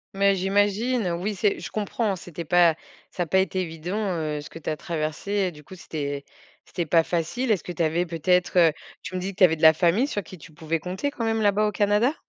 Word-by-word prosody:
Mais 200 Hz, 0 st, +3 dB
j'imagine, 205 Hz, +2 st, +1 dB
oui, 195 Hz, +5 st, -2 dB
c'est 205 Hz, +1 st, +1 dB
je -, -, -6 dB
comprends, 210 Hz, -1 st, -1 dB
c'était 170 Hz, -2 st, -8 dB
pas 170 Hz, -1 st, +4 dB, 0.4 s
ça 175 Hz, -, -2 dB
a -, -, -5 dB
pas 190 Hz, +4 st, +2 dB
été 190 Hz, 0 st, 0 dB
évident, 170 Hz, +3 st, -4 dB, 0.2 s
heu, 150 Hz, -2 st, -2 dB
ce 145 Hz, -, -9 dB
que 165 Hz, -, -10 dB
tu 160 Hz, -, -5 dB
as 155 Hz, -, -2 dB
traversé 155 Hz, +3 st, -4 dB
et 195 Hz, -3 st, +1 dB
du 150 Hz, -1 st, -14 dB
coup, 185 Hz, -, -12 dB
c'était 145 Hz, -5 st, -5 dB, 0.4 s
c'était 175 Hz, -2 st, -4 dB
pas 165 Hz, +2 st, +4 dB
facile. 180 Hz, +10 st, -1 dB
Est-ce 200 Hz, -, 0 dB
que 175 Hz, -, -5 dB
tu 170 Hz, -, -1 dB
avais 165 Hz, +3 st, +1 dB
peut-être, 180 Hz, +2 st, +1 dB
heu, 165 Hz, -2 st, +6 dB, 0.3 s
tu 185 Hz, -1 st, -7 dB
me -, -, -1 dB
dis 190 Hz, +2 st, -3 dB
que 200 Hz, -, -18 dB
tu -, -, +5 dB
avais 160 Hz, -3 st, +5 dB
de -, -, -12 dB
la 160 Hz, 0 st, +8 dB
famille 180 Hz, -, +2 dB
sur 205 Hz, -8 st, -3 dB
qui 185 Hz, -, -11 dB
tu 155 Hz, 0 st, -14 dB
pouvais 160 Hz, +1 st, -2 dB
compter 190 Hz, -, -3 dB
quand 230 Hz, -5 st, -4 dB
même, 225 Hz, 0 st, 0 dB
là-bas, 210 Hz, +1 st, +3 dB
au -, -, -1 dB
Canada? 210 Hz, +9 st, +2 dB
180 Hz, 250 wpm, -25 LUFS, 165-205 Hz, 0.4 s, la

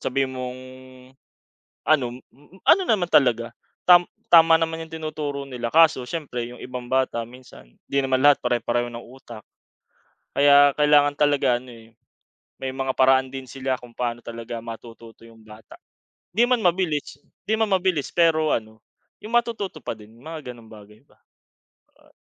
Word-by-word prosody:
sabihin 135 Hz, 0 st, -1 dB
mong 125 Hz, 0 st, -6 dB, 1.3 s
ano 125 Hz, -5 st, +1 dB, 0.4 s
ano 385 Hz, -, +5 dB
naman 185 Hz, -, +1 dB
talaga 120 Hz, -4 st, +3 dB, 0.4 s
tam 175 Hz, 0 st, +8 dB, 0.3 s
tama 165 Hz, -1 st, +7 dB
naman 165 Hz, 0 st, -2 dB
yung 160 Hz, -, -18 dB
tinuturo 155 Hz, -3 st, -5 dB
nila, 125 Hz, -3 st, -5 dB
kaso 160 Hz, -6 st, +4 dB
siyempre 130 Hz, -7 st, -4 dB
yung 125 Hz, -, -12 dB
ibang 125 Hz, -1 st, -7 dB
bata 130 Hz, -3 st, 0 dB
minsan 125 Hz, -, -16 dB, 0.2 s
di 140 Hz, -, -1 dB
naman 130 Hz, -1 st, 0 dB
lahat 145 Hz, -1 st, +6 dB
pare-pareho 120 Hz, 0 st, -1 dB
ng 115 Hz, -, -7 dB
utak. 120 Hz, -3 st, -13 dB, 0.9 s
Kaya 145 Hz, 0 st, +6 dB
kailangan 145 Hz, -1 st, +4 dB
talaga 145 Hz, -4 st, +2 dB
ano, 125 Hz, 0 st, -14 dB
eh, 115 Hz, -1 st, -15 dB, 0.7 s
may 130 Hz, -, -3 dB
mga 135 Hz, 0 st, -3 dB
paraan 130 Hz, 0 st, +3 dB
din 130 Hz, -2 st, -8 dB
sila 130 Hz, 0 st, -2 dB
kung 125 Hz, -, -13 dB
paano 120 Hz, -1 st, -3 dB
talaga 115 Hz, 0 st, -7 dB
matututo 115 Hz, 0 st, -11 dB
yung 115 Hz, -1 st, -18 dB
bata, 110 Hz, 0 st, -15 dB, 0.6 s
di 235 Hz, +6 st, +2 dB
man 250 Hz, -3 st, +1 dB
mabilis 170 Hz, -6 st, -1 dB, 0.2 s
di 215 Hz, -, -2 dB
man 220 Hz, -, +2 dB
mabilis 180 Hz, -6 st, -1 dB
pero 160 Hz, -2 st, +3 dB
ano 110 Hz, 0 st, -7 dB, 0.4 s
yung 225 Hz, +3 st, -5 dB
matututo 215 Hz, -, -1 dB
pa -, -, -4 dB
din 105 Hz, +1 st, -16 dB
mga 150 Hz, 0 st, -9 dB
ganong 115 Hz, -2 st, -17 dB
bagay 105 Hz, 0 st, -15 dB
ba, -, -, -30 dB, 0.8 s
oh. -, -, -25 dB
130 Hz, 155 wpm, -23 LUFS, 120-155 Hz, 1.3 s, tam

